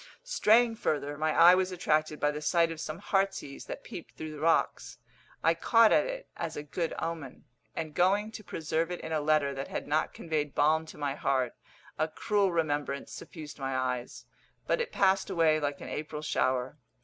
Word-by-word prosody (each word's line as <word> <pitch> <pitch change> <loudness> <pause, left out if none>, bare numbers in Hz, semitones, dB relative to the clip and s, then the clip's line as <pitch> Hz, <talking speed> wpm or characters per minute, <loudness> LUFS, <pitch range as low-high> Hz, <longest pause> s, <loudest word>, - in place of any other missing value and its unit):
Straying 235 - +3
further, 145 -6 -1
my 155 +1 0
eye 170 +3 +8
was 185 0 +1
attracted 155 -3 0
by 150 - +2
the 150 0 -5
sight 165 +2 +2
of 160 - -6
some 155 - -5
heartsease 195 -7 -1
that - - -7
peeped 170 - -9
through 155 0 -6
the 150 - -8
rocks. 165 +2 +1 0.5
I 165 - +5
caught 225 +6 +5
at - - +4
it - - -6
as 165 -2 -4
a 145 - -4
good 165 +3 -3
omen, 160 -6 -5 0.3
and 160 -2 -4
going 200 +5 +2
to 215 - -9
preserve 160 -1 -2
it 180 - -4
in 160 - -6
a 155 -1 +1
letter 150 -2 +2
that 135 0 -5
had - - -5
not 155 +2 +1
conveyed 150 -3 -2
balm 160 +2 +3
to - - -11
my 145 -2 -1
heart, 130 -3 0 0.5
a 155 - +2
cruel 200 +4 +1
remembrance 145 -4 -1
suffused 155 -3 -9
my 135 -1 -2
eyes; 125 -1 -3 0.4
but 485 - +1
it 475 0 -3
passed 195 - +2
away 165 -4 +3
like 145 -1 -3
an - - -7
April 150 0 -5
shower. 130 -1 0
155 Hz, 195 wpm, -30 LUFS, 145-180 Hz, 0.5 s, eye